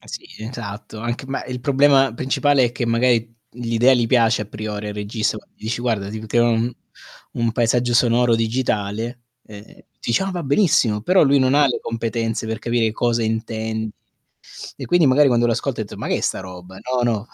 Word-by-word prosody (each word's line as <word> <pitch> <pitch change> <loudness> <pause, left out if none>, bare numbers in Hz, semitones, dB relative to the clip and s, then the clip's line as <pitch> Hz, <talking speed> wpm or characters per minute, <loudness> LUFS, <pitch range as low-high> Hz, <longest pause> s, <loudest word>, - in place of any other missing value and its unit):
Ma - - -21
sì, - - -7
esatto, 110 -1 -7
anche 120 +3 -4
ma 135 0 -4
il 125 0 -5
problema 135 -1 +3
principale 135 +2 +2
è 120 - -2
che 120 0 -3
magari 115 0 +1 0.2
l'idea 120 +2 +2
gli 120 -1 +1
piace 115 -2 +3
a - - -12
priori 105 0 -5
al - - -6
regista, 110 +1 -2
gua - - -14
gli - - -21
dici 115 +2 -3
guarda: 110 -5 -1
"Si 110 - -5
poteva 120 +2 +1
un 115 +1 0 0.6
un 115 -1 0
paesaggio 120 +1 +1
sonoro 120 0 +3
digitale". 115 0 -2 0.3
Ehm, 105 -1 -11 0.4
dice: 120 +10 0
"Ah, 195 - -2
va 175 -2 -4
benissimo!" 135 - +2
Però 185 - +4
lui 140 -1 +4
non 130 +1 +3
ha 145 -1 +5
le 125 - 0
competenze 115 0 -3
per 110 -1 -4
capire 115 -1 0
cosa 120 +1 0
intendi; 110 0 -3 0.9
e - - -6
quindi 175 -2 +3
magari 140 +2 +5
quando 120 -2 +3
lo 115 - +2
ascolta - - -2
ha - - -1
detto: - - -11
"Ma - - -5
che - - +1
è - - -5
sta - - -1
roba? 90 0 -10
No, 125 0 -2
no." 110 0 -3
115 Hz, 205 wpm, -21 LUFS, 110-125 Hz, 0.9 s, ha